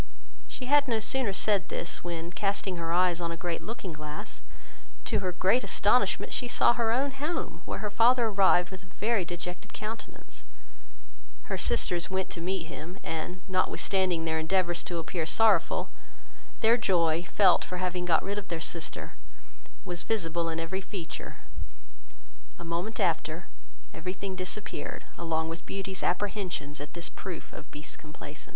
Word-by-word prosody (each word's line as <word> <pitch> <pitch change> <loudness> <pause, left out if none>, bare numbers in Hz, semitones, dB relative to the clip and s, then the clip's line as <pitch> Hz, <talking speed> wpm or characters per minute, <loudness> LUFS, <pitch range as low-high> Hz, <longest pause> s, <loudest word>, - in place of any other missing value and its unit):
She 255 - -6
had 290 +2 +5
no 230 -3 +2
sooner 250 0 +1
said 200 +1 +2
this, 170 - -3
when 170 0 -3
casting 195 -1 -1
her 165 -1 -2
eyes 175 0 +3
on 170 0 -1
a 170 - -4
great 170 -1 -2
looking 210 -6 -5
glass, 150 0 -7 0.6
to - - +2
her 185 -2 0
great 190 +8 +3
amazement - - +3
she 250 - 0
saw 240 - +5
her 235 -2 +2
own 270 +4 +2
home, 295 +6 -3
where - - -3
her 210 - -1
father 240 +3 +5
arrived 195 -4 +4
with 190 -1 -7
a 190 - -16
very 210 +2 +1
dejected 175 +1 -6
countenance; 220 +1 -7 1.0
her - - -3
sisters 175 -1 +1
went 190 0 -1
to 170 - -4
meet 185 0 0
him, 165 +3 -7
and, 180 +3 -3
notwithstanding 185 -2 +2
their 160 0 +1
endeavours 175 +1 +2
to 175 - -2
appear 165 0 -2
sorrowful, 200 -4 +4 0.7
their 230 +2 +6
joy, 170 -7 +3
felt 190 -4 +6
for 180 - -4
having 180 0 -1
got 170 -2 +4
rid 200 +1 -1
of 200 - -10
their 170 - -2
sister, 165 0 -3 0.7
was 175 -3 -2
visible 170 -6 0
in 165 0 -2
every 165 +4 -2
feature: 190 -4 -6 1.2
a - - -8
moment 175 +6 -2
after, - - +1 0.5
every 185 - -3
thing 190 0 -4
disappeared, 185 +3 -4
and 165 0 -2
Beauty's 195 0 -3
apprehensions 180 -7 -1
at 145 +1 -7
this 170 0 -3
proof 185 -3 -7
of - - -9
Beast's 150 -1 -6
complaisance. 150 -1 -8
185 Hz, 160 wpm, -30 LUFS, 170-205 Hz, 1.2 s, their